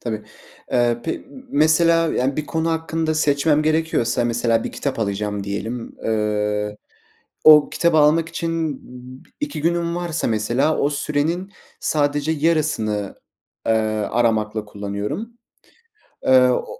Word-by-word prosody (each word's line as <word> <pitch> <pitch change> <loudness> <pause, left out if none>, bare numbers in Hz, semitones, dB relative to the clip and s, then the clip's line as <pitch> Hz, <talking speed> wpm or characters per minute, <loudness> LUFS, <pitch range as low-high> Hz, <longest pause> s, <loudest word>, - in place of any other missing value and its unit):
Tabii. 110 -3 -4 0.5
Eee, 120 -1 +2
pe 165 - -3 0.3
mesela 165 +2 +3
yani, 130 +2 0
bir 150 - -3
konu 160 0 -1
hakkında 160 -1 -1
seçmem 150 0 +2
gerekiyorsa 155 -7 +1
mesela 115 -1 +1
bir - - -5
kitap 140 -4 -3
alacağım 105 -1 -2
diyelim. 110 +4 -5
Eee, 105 -1 -1 0.7
o 150 -1 +8
kitabı 170 -2 +2
almak 155 +2 +4
için 165 -4 -3 0.6
2 295 - -3
günüm 170 0 0
varsa 170 -2 -2
mesela, 120 +8 +1
o 145 - +2
sürenin 155 +7 -2 0.3
sadece 145 0 0
yarısını, 145 - 0 0.5
eee, 115 - +3 0.4
aramakla 110 -2 0
kullanıyorum. 105 - -5 0.9
Eee, 130 -1 +5
o 125 - -1
145 Hz, 120 wpm, -21 LUFS, 110-160 Hz, 0.9 s, o